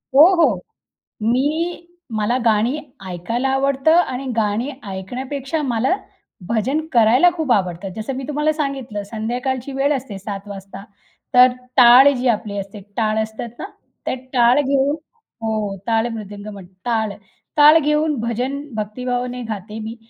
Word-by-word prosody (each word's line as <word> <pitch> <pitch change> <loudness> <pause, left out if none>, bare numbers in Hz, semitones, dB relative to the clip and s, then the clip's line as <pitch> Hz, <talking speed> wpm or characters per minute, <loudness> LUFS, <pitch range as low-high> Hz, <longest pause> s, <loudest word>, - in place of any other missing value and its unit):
हो, 295 - +10
हो. 290 - +4 0.7
मी 305 +9 0 0.3
मला 225 +4 +1
गाणी 225 +6 +2 0.3
ऐकायला 230 +9 -2
आवडतं, 275 +2 +2
आणि 275 -6 +1
गाणी 220 +4 0 0.2
ऐकण्यापेक्षा 265 +10 -4
मला 255 +5 +1 0.5
भजन 260 +8 0
करायला 245 +8 +5
खूप 305 -6 -1
आवडतं. 185 -1 -1
जसं 220 +5 -4
मी 265 - -5
तुम्हाला 300 +1 +1
सांगितलं 270 -9 -3
संध्याकाळची 245 +5 -3
वेळ 280 +2 +1
असते 240 -7 -6
7 200 0 -6
वाजता. 195 0 -9 0.5
तर 250 0 +8 0.3
टाळ 250 +2 +9
जी 250 0 -1
आपली 210 -3 0
असते, 200 +1 -6 0.2
टाळ 220 -1 +1
असतात 220 +2 -6
ना, - - -4 0.4
त्या - - -1 0.2
टाळ 245 +2 +5
घेऊन 280 +1 +1 0.5
हो. 215 -3 -2
टाळ 225 +1 +2
मृदंग 205 -1 -8
म्हणतात 190 -2 -13
टाळ, 220 -3 0 0.4
टाळ 300 +2 +8
घेऊन 300 0 +1
भजन 250 +5 -2
भक्तिभावाने 245 +3 -3
गाते 215 +1 -5
मी. 220 +1 -6
240 Hz, 135 wpm, -20 LUFS, 215-275 Hz, 0.7 s, हो